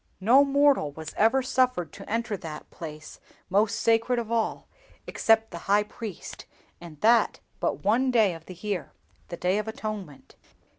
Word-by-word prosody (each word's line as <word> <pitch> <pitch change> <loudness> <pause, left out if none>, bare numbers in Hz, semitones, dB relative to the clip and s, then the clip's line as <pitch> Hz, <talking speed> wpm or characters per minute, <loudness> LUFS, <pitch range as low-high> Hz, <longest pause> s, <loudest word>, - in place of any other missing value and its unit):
"No 240 +8 +6
mortal 280 - +3
was 160 +1 -8
ever 235 +5 +3
suffered 250 - +1
to 195 - -11
enter 225 -1 -1
that 160 -4 -9
place, 155 -2 -9 0.3
most 205 +2 +2
sacred 230 +2 +2
of 230 -1 -3
all, 230 -2 -1 0.4
except 225 0 +2
the 170 - -6
High 205 +1 +4
Priest, 210 -3 -8 0.4
and 165 -4 -11
that 230 +2 +4 0.2
but - - 0
on - - -13
one 235 +6 +2
day 220 -7 +3
of 165 -1 -12
the 185 - -9
year—the 180 -2 -7
Day 185 +4 +1
of 215 - -4
Atonement. 215 - -7
215 Hz, 160 wpm, -26 LUFS, 175-235 Hz, 0.4 s, No